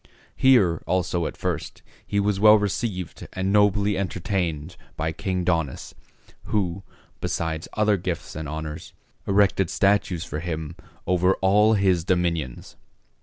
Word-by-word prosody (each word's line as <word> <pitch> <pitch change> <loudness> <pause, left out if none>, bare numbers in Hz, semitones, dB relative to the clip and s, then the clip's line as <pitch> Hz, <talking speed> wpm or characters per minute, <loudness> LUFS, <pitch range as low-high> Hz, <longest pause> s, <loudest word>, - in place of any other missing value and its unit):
Here 100 -11 +4
also 90 -2 0
at - - -8
first - - -4 0.2
he 100 - 0
was 100 -1 0
well 105 +1 +8
received 100 -3 -3
and 95 +1 -1
nobly 105 -1 +3
entertained 90 -4 -2 0.2
by 80 +1 -1
King 90 +2 -2
Daunus, 80 -6 -1 0.5
who, 95 -3 -1 0.4
besides 80 0 -3
other 105 -1 +2
gifts 90 -2 -5
and 80 -2 -5
honors, 75 0 -6 0.3
erected 95 -3 +3
statues 100 -4 +1
for 75 -4 -5
him 80 -1 -5 0.3
over 90 +1 +2
all 105 +3 +4
his 95 -4 +2
dominions. 85 -7 -2
90 Hz, 125 wpm, -24 LUFS, 85-100 Hz, 0.5 s, well